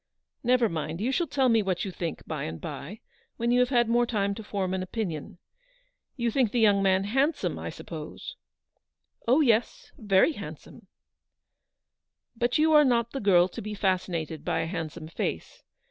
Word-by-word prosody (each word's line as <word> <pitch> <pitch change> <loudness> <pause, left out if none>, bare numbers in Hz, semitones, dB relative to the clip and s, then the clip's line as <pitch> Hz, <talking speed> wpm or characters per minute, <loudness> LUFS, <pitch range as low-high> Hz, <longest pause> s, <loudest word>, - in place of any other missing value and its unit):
Never 245 -1 +3
mind, 160 -2 -4
you 235 +6 0
shall 335 +5 0
tell 270 -2 +2
me 230 -2 +4
what 190 -2 -1
you 195 - -4
think 170 -2 -5
by - - -4
and 80 0 -6
by, 185 +10 -7 0.4
when 235 +1 0
you 245 - +4
have 250 0 +3
had 240 -3 +3
more 240 +1 +2
time 200 -4 0
to 220 +2 -8
form 195 -3 -2
an 190 - -1
opinion. 185 -2 -4 0.8
You 235 -3 -1
think 245 -3 +2
the 245 - 0
young 205 -3 +4
man 190 0 +3
handsome, 270 +10 0
I - - -5
suppose? - - -8 0.3
" - - -52
" - - -36
Oh, 260 +6 +5
yes! 230 -4 +1
very 200 +5 +4
handsome." - - -10 0.7
" - - -59
But 240 +2 +1
you 315 +1 +4
are 300 0 +8
not 235 -3 +2
the 275 - -4
girl 185 -5 +5
to - - -7
be 210 +1 -5
fascinated 180 -6 -1
by 165 - 0
a - - -2
handsome 165 -2 -5
face. 85 - -4
210 Hz, 190 wpm, -27 LUFS, 185-245 Hz, 0.8 s, are